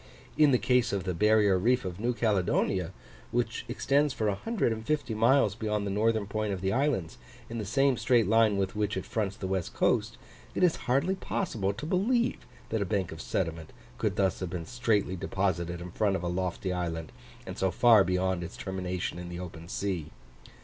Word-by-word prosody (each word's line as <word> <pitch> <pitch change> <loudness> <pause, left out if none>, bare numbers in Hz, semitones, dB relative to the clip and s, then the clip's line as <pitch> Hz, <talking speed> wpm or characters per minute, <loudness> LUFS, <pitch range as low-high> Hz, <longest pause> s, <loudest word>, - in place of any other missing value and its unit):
In 150 -1 +5
the 130 - +4
case 125 -1 +2
of 100 -2 -1
the 95 -1 -2
barrier 105 0 +4
reef 120 +3 +2
of 90 0 -5
New 120 +2 0
Caledonia, 95 -4 +1 0.4
which - - -1
extends 145 0 +1
for 110 - -1
150 115 - -1
miles 115 +5 +4
beyond 105 -2 -2
the 100 - -2
northern 110 +1 +1
point 105 +1 -2
of 95 - -5
the 95 0 0
islands, 130 - 0 0.3
in 115 - -3
the 105 - -3
same 135 +5 +2
straight 120 -3 +3
line 110 -2 +4
with 95 0 -1
which 105 0 -1
it - - -4
fronts 100 -3 -2
the - - -5
west 95 -2 -2
coast, - - +1 0.4
it - - +1
is 175 -3 +4
hardly 140 +9 +2
possible 125 - -2
to 125 - -7
believe 225 +8 +1 0.2
that 110 -1 -1
a - - +3
bank 95 -3 -1
of 80 - -7
sediment 80 -3 -3 0.3
could - - 0
thus 95 -1 +1
have 95 - -3
been 85 -2 -5
straightly 115 -6 0
deposited 90 -2 -1
in 90 +1 -7
front 100 +1 +1
of 90 - -3
a - - -1
lofty 90 +1 -2
island, 85 -3 -3 0.3
and - - -7
so 95 - +2
far 110 +2 +6
beyond 90 -1 0
its 85 - -8
termination 90 -2 -3
in 90 0 -7
the 90 0 -6
open 85 -2 -8
sea. 90 -4 -2
100 Hz, 195 wpm, -29 LUFS, 90-115 Hz, 0.4 s, far